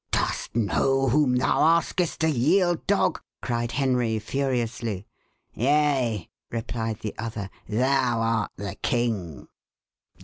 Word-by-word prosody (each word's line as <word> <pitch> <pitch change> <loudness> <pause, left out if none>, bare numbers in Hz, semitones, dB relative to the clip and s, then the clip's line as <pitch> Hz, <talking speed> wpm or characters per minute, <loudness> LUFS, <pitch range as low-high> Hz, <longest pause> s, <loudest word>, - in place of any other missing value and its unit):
"Dost - - -1
know 135 +4 +2
whom 135 -1 +3
thou 125 - +2 0.2
askest 170 0 -2
to 160 - +3
yield, 165 +5 +2
dog?" - - +2 0.2
cried 120 0 -2
Henry 125 -5 +1
furiously. 115 -4 -2 0.5
"Yea," 130 - +1 0.2
replied 115 -1 -3
the 105 - -4
other, 110 -4 -4 0.2
"thou 125 +1 +2
art 115 -1 0
the 100 -2 -5
king!" 110 - -1
120 Hz, 110 wpm, -25 LUFS, 110-135 Hz, 0.5 s, whom